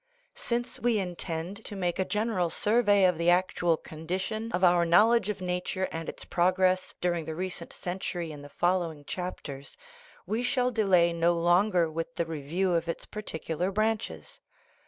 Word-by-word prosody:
Since 240 0 -3
we 240 -2 +2
intend 180 +1 -4
to 205 - -5
make 180 -2 -1
a 190 - +2
general 210 -5 0
survey 205 -1 +3
of 180 -3 +2
the 170 +1 +3
act 180 +1 +2
ual 170 -2 +2
condition 190 +8 -4
of 180 -2 -1
our 175 -1 +5
knowledge 210 +5 +4
of 205 -2 -3
nature 180 +1 -2
and 165 0 -4
its - - -9
prog 180 +1 +2
ress 185 0 +1
during 175 -2 0
the 160 0 -5
present 180 -1 -5
century 175 -2 -4
in 145 -1 -9
the 145 - -11
following 170 -3 0
chap 180 +3 -4
ters, 140 -1 -8 0.5
we 220 +3 -1
shall 250 0 +1
delay 185 -7 +3
no 170 +1 +3
longer 175 +1 +3
with 165 +1 -5
the 170 - 0
review 165 +4 -1
of 170 0 0
its 170 - -4
particular 175 -4 -3
branches. 215 +2 -2
180 Hz, 175 wpm, -28 LUFS, 170-205 Hz, 0.5 s, our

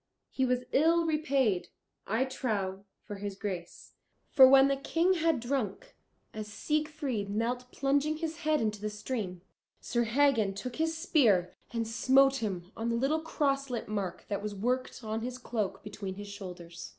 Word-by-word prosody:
He 265 - +1
was 250 0 +1
ill 330 +4 +4
repaid, 275 - +1 0.4
I 225 +5 +1
trow, 200 -7 -3 0.2
for 205 - -7
his 200 0 -5
grace. 190 -4 -6 0.4
For 260 -1 +9
when 270 +1 +7
the 275 - +2
King 330 +6 +2
had 325 -5 +2
drunk, 270 - -3 0.4
as 215 -1 -5
Siegfried 295 -2 -2
knelt 245 +4 -2
plunging 285 +3 +1
his 325 0 -4
head 310 -2 +1
into 210 -2 -1
the 215 - -2
stream, 210 -4 -4 0.4
Sir 235 0 0
Hagen 230 -5 +3
took 240 +4 -6
his 320 0 0
spear 230 - +3 0.2
and 230 -2 -2
smote 270 +4 +4
him 190 -6 -4
on 225 +1 -2
the 230 - +1
little 275 +6 +1
crosslet 275 -6 -1
mark 195 -4 -3
that 200 -1 -2
was 210 0 -4
worked 250 +4 -2
on 220 +1 -3
his 250 +2 -4
cloak 215 -6 -3
between 200 -2 -6
his 205 +1 -8
shoulders. 180 -4 -8
240 Hz, 165 wpm, -30 LUFS, 205-275 Hz, 0.4 s, For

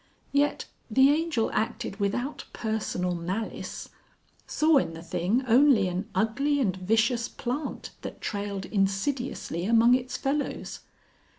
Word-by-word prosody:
Yet 285 +1 +1 0.2
the 265 +5 +6
Angel 310 -7 0
acted 220 -2 -2
without 245 +8 -2
personal 210 -5 -2
malice 185 +6 -4 0.6
saw 310 -1 +4
in 165 -11 0
the 165 - -9
thing 185 +9 0
only 240 -4 +5
an 185 +5 -3
ugly 275 +7 +1
and 200 -9 +1
vicious 225 +5 +1
plant 260 +4 -4
that - - -7
trailed 200 -2 -3
insidiously 195 - -1
among 230 +2 +5
its 255 0 0
fellows. 280 +2 -2
225 Hz, 120 wpm, -27 LUFS, 195-270 Hz, 0.6 s, the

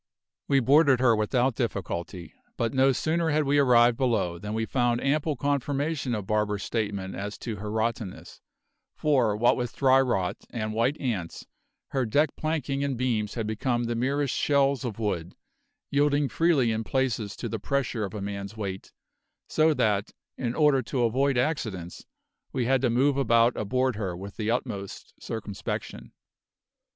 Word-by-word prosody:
We 135 -1 +3
boarded 140 +1 +5
her 120 -3 +4
without 120 +4 +1
difficulty; 90 -6 -4 0.2
but 115 -1 -1
no 135 0 +4
sooner 160 +5 0
had 155 0 +2
we 145 +1 +2
arrived 120 -3 +5
below 110 -10 0
than 105 +3 -5
we 110 0 0
found 120 -1 +1
ample 150 +3 0
confirmation 140 0 -1
of 105 -3 -4
Barber's 105 -1 0
statement 100 -4 -3
as 105 +2 -5
to 115 -3 -5
her 105 +2 -6
rottenness, 110 -2 -3 0.5
for, 125 -9 +2
what 120 +3 +4
with 120 -2 -4
dry 135 -1 +5
rot 100 -7 0
and 110 -2 -3
white 120 +7 +1
ants, 105 -11 -3 0.4
her 135 -2 0
deck 145 +8 +2
planking 145 -3 -2
and 140 -3 -1
beams 115 -4 -1
had 115 -3 -2
become 120 +3 -1
the 120 0 -1
merest 135 +3 0
shells 140 -2 +2
of 115 -5 -4
wood, 95 -6 -3 0.6
yielding 145 0 +2
freely 150 -8 +2
in 110 0 -1
places 115 -5 -1
to - - -5
the 115 - -4
pressure 130 -2 -1
of 100 0 -5
a 105 - -4
man's 100 +1 -5
weight, 95 -3 -5 0.6
so 155 +1 +3
that, 105 -7 +1 0.3
in 120 -1 -3
order 150 -4 +4
to 125 +1 -1
avoid 130 +3 +2
accidents, 110 - -2 0.4
we 130 -3 -1
had 130 +1 +2
to 130 - +2
move 135 +4 +2
about 115 -2 +3
aboard 125 +2 0
her 95 -5 -3
with 100 +2 -8
the 110 -1 -2
utmost 110 -5 -4
circumspection. 105 -3 -5
120 Hz, 165 wpm, -27 LUFS, 105-135 Hz, 0.6 s, boarded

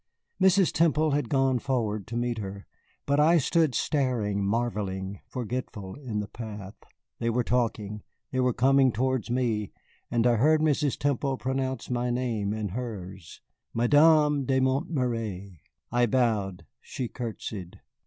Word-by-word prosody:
Mrs. 190 -1 +5
Temple 155 -1 +2
had 140 -4 0
gone 135 -2 +2
forward 110 -6 -1
to 115 +2 -4
meet 120 -1 -1
her, 100 -1 -6 0.4
but 140 +1 +2
I 165 +3 +5
stood 160 -1 +2
staring, 120 -9 0
marvelling, 100 -3 -2
forgetful, 115 -5 -5
in 120 -7 -4
the 105 - -6
path. 105 -4 -8 0.5
They 115 - 0
were 120 +2 +1
talking, 110 -4 -1 0.3
they 130 - -1
were 125 0 +3
coming 130 +2 +4
towards 125 0 -1
me, 115 -5 0 0.4
and 115 -1 +1
I 120 -1 +4
heard 155 +7 +4
Mrs. 150 -2 +1
Temple 140 -1 0
pronounce 130 -1 -2
my 125 0 0
name 120 -5 -1
and 105 -3 -3
hers 95 -7 -7 0.3
Madame 150 +3 +4
de 130 0 +2
Montméry. 120 - -1 0.3
I 120 0 +3
bowed, 105 -8 0 0.2
she 125 - -5
courtesied. 110 -6 -6
120 Hz, 140 wpm, -27 LUFS, 105-135 Hz, 0.5 s, Mrs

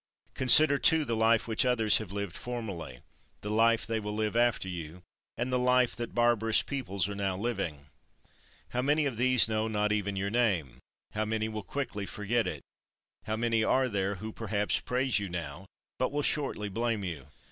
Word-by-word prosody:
Consider, 140 +2 +7
too, 160 -2 +3
the 115 -3 -1
life 110 0 +2
which 110 +3 +2
others 115 -5 +3
have 110 -4 -8
lived 100 -2 -4
formerly, 100 - -6 0.4
the 105 - -4
life 115 +1 +3
they 115 0 -2
will 105 0 -5
live 110 0 -1
after 120 -4 +2
you, 85 -1 -7 0.3
and 125 +2 -2
the 125 - +2
life 125 -1 +2
that 120 0 -6
barbarous 115 -2 +3
peoples 100 -10 -2
are 100 - -5
now 100 -2 -2
living. 95 -10 -3 0.8
How 125 - -1
many 145 +3 +2
of 130 -5 -2
these 125 -1 +4
know 110 0 -1
not 105 -1 0
even 100 -1 -1
your 100 +1 -2
name; 90 - 0 0.3
how 110 +1 -1
many 110 0 -1
will 110 -1 -5
quickly 105 -2 -4
forget 115 +3 -1
it; - - -5 0.6
how 110 0 -2
many 115 0 +1
are 130 +3 +2
there 100 -3 -1
who 110 +4 -7
perhaps 105 -2 -1
praise 125 -2 0
you 100 -2 -4
now, 85 +1 -6 0.3
but 130 - 0
will 145 0 -1
shortly 135 -9 -1
blame 115 +1 -2
you. 80 -7 -6
110 Hz, 185 wpm, -29 LUFS, 100-120 Hz, 0.8 s, Consider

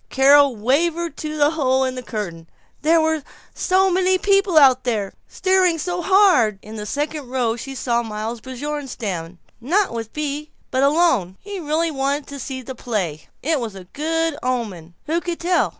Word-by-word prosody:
Carol 280 0 +5
wavered 325 +9 0
to 310 0 -4
the 295 0 +4
hole 265 -4 +1
in 260 -1 -1
the 255 - -5
curtain. 175 -9 -6 0.3
There 325 +2 +4
were 315 -1 +1 0.3
so 380 0 +2
many 370 +1 +3
people 390 -3 +2
out 260 -3 +6
there, 215 -6 -1
staring 370 -3 +2
so 355 +3 -2
hard 360 - +4
In 215 +1 -9
the 210 -1 -6
second 295 0 -3
row 245 -3 0
she 270 +3 -7
saw 240 -2 0
Miles 220 +1 -5
Bjornstam, 250 - -5 0.2
not 365 - +1
with 225 -1 -5
Bea 300 0 -4 0.2
but 260 - +1
alone. 280 - +2
He 405 -1 -7
really 320 +1 0
wanted 280 +1 -1
to 280 0 -7
see 260 0 -5
the 260 - -6
play! 195 -11 -3 0.2
It 310 +1 +1
was 225 -5 -5
a 190 - -9
good 325 +1 0
omen. 205 -10 -3
Who 330 +3 0
could 345 -1 -4
tell? 355 +1 +2
280 Hz, 175 wpm, -21 LUFS, 235-325 Hz, 0.3 s, out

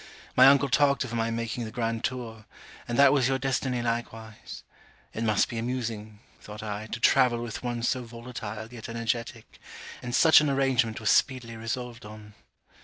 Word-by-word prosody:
My 130 +1 +8
uncle 140 +1 +5
talked 140 +1 +3
of 125 -2 -7
my 115 -1 0
making 115 +1 -3
the 110 - -6
grand 115 0 -2
tour; 115 -4 -4 0.4
and 120 - -2
that 140 -1 +6
was 135 -4 +3
your 135 0 +1
destiny 130 -2 -1
likewise. 115 -2 -5 0.5
It 115 - -3
must 110 -2 +2
be 115 - -5
amusing, 115 -3 -4 0.2
thought 105 0 -10
I, 105 0 -5
to 115 - -5
travel 125 -1 +4
with 115 -2 -6
one 120 -1 -3
so 125 +1 0
volatile 115 -2 -8
yet 115 -1 -9
energetic; 115 -1 -4 0.4
and 120 0 -3
such 160 0 +7
an 150 - +1
arrangement 130 -5 +1
was 110 - +1
speedily 125 -3 +1
resolved 115 +1 -5
on. 105 0 -12
115 Hz, 175 wpm, -27 LUFS, 110-125 Hz, 0.5 s, My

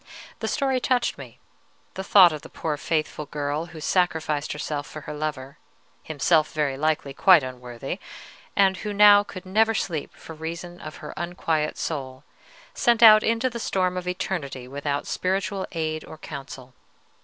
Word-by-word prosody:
The - - -3
story 265 -2 0
touched 250 -1 0
me: - - -11 0.6
the 190 - -5
thought 190 -3 +7
of 150 - -6
the - - -12
poor 155 -2 -3
faithful 155 0 -2
girl 145 +2 -3
who 165 -1 -11
sacrificed 160 -3 0
herself 150 -1 -4
for 155 - -9
her 150 - -7
lover, 150 -3 -5 0.4
himself, 155 +1 +1
very 150 -3 0
likely, 150 -1 -1
quite 175 +1 +6
unworthy, 125 -2 -6 0.6
and 190 -1 +4
who 210 +1 -4
now 205 0 +8
could 185 -2 -9
never 220 +4 +2
sleep 160 -8 -3
for 160 - -11
reason 170 +2 -7
of 155 - -8
her - - -7
unquiet 165 -3 -1
soul, 135 -4 -4 0.5
sent 240 -2 +3
out 215 -1 +10
into 230 +3 +1
the 235 -2 -5
storm 185 -4 0
of 180 0 -4
eternity 145 -8 -4
without 145 +1 -3
spiritual 190 +1 -2
aid 155 -1 -2
or 160 - -11
counsel. 135 -4 -9
160 Hz, 160 wpm, -25 LUFS, 145-190 Hz, 0.6 s, out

